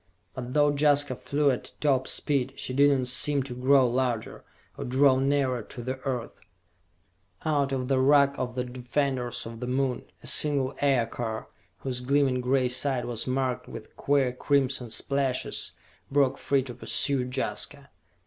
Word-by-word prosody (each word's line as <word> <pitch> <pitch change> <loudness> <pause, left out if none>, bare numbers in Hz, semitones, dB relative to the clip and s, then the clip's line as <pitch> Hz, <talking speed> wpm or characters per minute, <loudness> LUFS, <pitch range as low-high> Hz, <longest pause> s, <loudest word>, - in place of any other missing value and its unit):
But 125 +1 -6
though 145 -1 +4
Jaska 145 -2 +3
flew 145 +3 +1
at 125 - -5
top 135 -3 +1
speed, 135 -2 0
she 130 - -3
did 140 +2 +5
not 135 -3 +1
seem 135 +2 +2
to 130 -2 -6
grow 130 +1 +4
larger, 120 -2 -2 0.3
or - - -5
draw 130 +1 +4
nearer 135 -2 +1
to 120 +3 -9
the 130 +2 -4
Earth! 130 -3 -3 1.1
Out 145 -3 +1
of 130 -2 -2
the 135 -1 +2
ruck 140 +1 +5
of 125 -1 -3
the 125 - -1
defenders 125 0 -2
of 115 0 -8
the 125 - -4
Moon, 130 -1 -1 0.2
a - - -12
single 140 -3 0
Aircar, 120 -4 0 0.3
whose 125 -2 -3
gleaming 135 -1 +2
gray 130 +1 +2
side 130 0 0
was 120 0 -3
marked 130 -1 -1
with - - -10
queer 140 -3 +1
crimson 130 -2 0
splashes, 135 +2 -1 0.4
broke 140 -2 +2
free 140 -2 +1
to 125 -2 -7
pursue 135 +2 0
Jaska! - - -3
130 Hz, 160 wpm, -27 LUFS, 125-140 Hz, 1.1 s, did